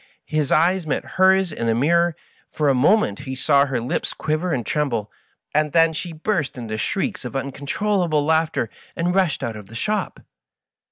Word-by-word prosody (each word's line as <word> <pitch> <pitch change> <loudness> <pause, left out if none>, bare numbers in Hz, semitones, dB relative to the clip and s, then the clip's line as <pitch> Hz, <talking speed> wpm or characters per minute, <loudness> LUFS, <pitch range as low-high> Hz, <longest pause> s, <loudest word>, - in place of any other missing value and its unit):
His 155 -3 -1
eyes 175 +2 +3
met 145 - -1
hers 190 -1 +5
in 115 -5 -3
the 115 - +2
mir 170 +7 +3
ror; - - -9 0.4
for 150 -2 +1
a - - +4
moment 135 - +3
he 130 - -6
saw 140 +1 +3
her 130 -3 -1
lips 120 +2 -2
quiver 155 +4 -1
and 125 -7 -1
tremble, 120 -9 -1 0.4
and 150 -1 +1
then 165 -1 +4
she 170 +2 -5
burst 160 -4 -2
into 115 -3 -4
shrieks 195 - -2
of - - -7
uncontrollable 150 +4 0
laugh 160 +1 +2
ter, 115 - -2 0.3
and 175 +1 0
rushed 185 -5 +1
out 115 - -3
of 105 -2 -10
the 115 - -12
shop. 210 - -2
155 Hz, 185 wpm, -22 LUFS, 130-175 Hz, 0.4 s, hers